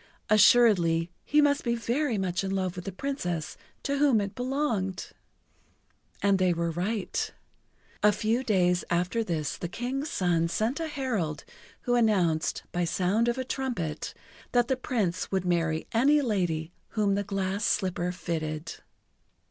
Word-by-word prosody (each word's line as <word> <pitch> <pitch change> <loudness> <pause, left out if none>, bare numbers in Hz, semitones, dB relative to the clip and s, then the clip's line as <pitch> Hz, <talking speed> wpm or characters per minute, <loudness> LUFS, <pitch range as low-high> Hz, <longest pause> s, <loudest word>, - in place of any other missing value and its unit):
Assuredly 185 -7 +5
he 300 +1 +3
must 285 0 +2
be 235 -1 +1
very 240 +2 0
much 185 -1 -1
in 195 - -2
love 190 -2 -1
with 180 - -7
the 195 - -3
Princess 180 - -3 0.3
to 280 0 -1
whom 280 -6 +4
it 200 -1 -3
belonged! 245 -8 -2 1.1
And 200 -1 +3
they 185 -1 +3
were 170 0 -1
right. 185 +5 -2 0.7
A 210 - +6
few 225 +4 0
days 180 -6 +2
after 180 +6 +1
this 160 -7 -2
the 175 - -4
King's 265 - -3
son 170 -3 +1
sent 220 - -1
a 325 - -2
herald 225 - -2 0.4
who 245 - 0
announced, 190 -9 +2
by 175 - 0
sound 185 +7 +1
of 240 +1 +1
a 260 - -1
trumpet, 240 - -3 0.4
that 245 0 +3
the 265 - +3
Prince 210 -8 -2
would 190 -2 0
marry 165 -3 0
any 275 +6 +4
lady 175 -8 -1 0.3
whom 205 -2 +3
the 200 +1 0
glass 195 0 -2
slipper 180 -4 0
fitted. 160 -2 -4
195 Hz, 150 wpm, -28 LUFS, 175-240 Hz, 1.1 s, A